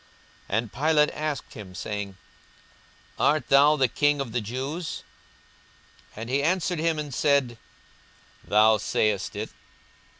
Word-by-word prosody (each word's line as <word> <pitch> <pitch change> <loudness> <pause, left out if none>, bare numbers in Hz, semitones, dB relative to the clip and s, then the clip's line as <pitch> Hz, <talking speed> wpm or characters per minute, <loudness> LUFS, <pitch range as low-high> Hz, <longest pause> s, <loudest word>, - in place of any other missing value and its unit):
42:023:003 - - +1
And 115 -1 -3
Pilate 150 +2 +3
asked 150 -2 -4
him, 95 -4 -10
saying, 100 +1 -5 1.0
Art 150 -3 +2
thou 145 +2 +6
the 135 -3 +3
King 145 +4 +1
of 135 -4 -3
the 120 +1 -1
Jews? 135 - -4 1.1
And 110 +2 -6
he 135 +3 +1
answered 175 +2 0
him 165 0 +1
and 150 -2 -5
said, 135 -5 +1 0.8
Thou 110 +1 +4
sayest 105 0 0
it. - - -4
135 Hz, 130 wpm, -26 LUFS, 110-150 Hz, 1.1 s, thou